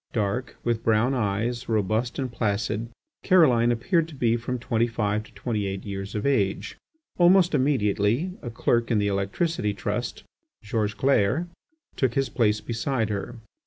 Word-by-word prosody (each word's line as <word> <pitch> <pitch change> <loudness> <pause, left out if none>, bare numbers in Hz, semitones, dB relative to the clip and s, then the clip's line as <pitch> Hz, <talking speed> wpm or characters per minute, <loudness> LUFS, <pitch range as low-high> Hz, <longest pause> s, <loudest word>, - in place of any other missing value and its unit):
Dark, 110 +3 -1
with 115 -1 -1
brown 115 +4 +2
eyes, 115 +1 -1
robust 110 +3 0
and 130 -3 -2
placid, 110 0 -1 0.3
Caroline 130 -11 +4
appeared 125 +8 +1
to 160 - -11
be 120 -3 +2
from 120 +2 -3
twenty 115 -1 0
five 105 -2 -1
to - - -18
twenty 105 -5 -2
eight 95 0 -5
years 100 0 -5
of 105 - -2
age. 105 -9 0 0.4
Almost 175 0 +5
immediately, 130 - +1
a 120 - -5
clerk 115 0 0
in 115 - +2
the 105 -1 +1
Electricity 100 - -1
Trust, - - -3 0.4
George 105 0 -1
Clair, 130 - +2 0.5
took 130 -3 +1
his 135 -2 +1
place 110 -2 +1
beside 115 +1 -1
her. 105 +3 -4
115 Hz, 155 wpm, -25 LUFS, 105-130 Hz, 0.5 s, Almost